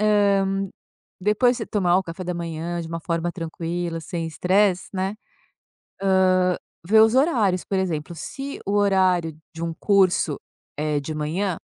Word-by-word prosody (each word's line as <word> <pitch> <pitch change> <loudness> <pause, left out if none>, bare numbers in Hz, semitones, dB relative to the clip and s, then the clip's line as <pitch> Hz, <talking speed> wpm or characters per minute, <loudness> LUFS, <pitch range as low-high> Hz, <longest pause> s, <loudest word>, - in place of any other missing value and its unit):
hã, 195 -2 +2 0.5
depois 225 +5 +3
você 225 - -4
tomar 180 -4 +2
o 190 - +2
café 170 +1 -7
da 180 0 -2
manhã 170 0 -4
de 165 - -6
uma 165 0 -4
forma 170 +1 -1
tranquila, 170 0 -4
sem 165 +1 -4
estresse, 185 +3 +2
né, 190 0 -1
hã, 215 - -9 1.7
vê 220 +3 +6
os 225 +2 +5
horários, 230 - +2
por 195 - -1
exemplo, 170 -3 -2
se 275 - -6
o 200 - -1
horário 185 -5 +3 0.2
de 165 - -7
um 170 - -2
curso 185 -6 +2 0.4
é 150 -1 0
de 155 +2 -5
manhã, 165 +5 -1
180 Hz, 155 wpm, -23 LUFS, 165-200 Hz, 1.7 s, vê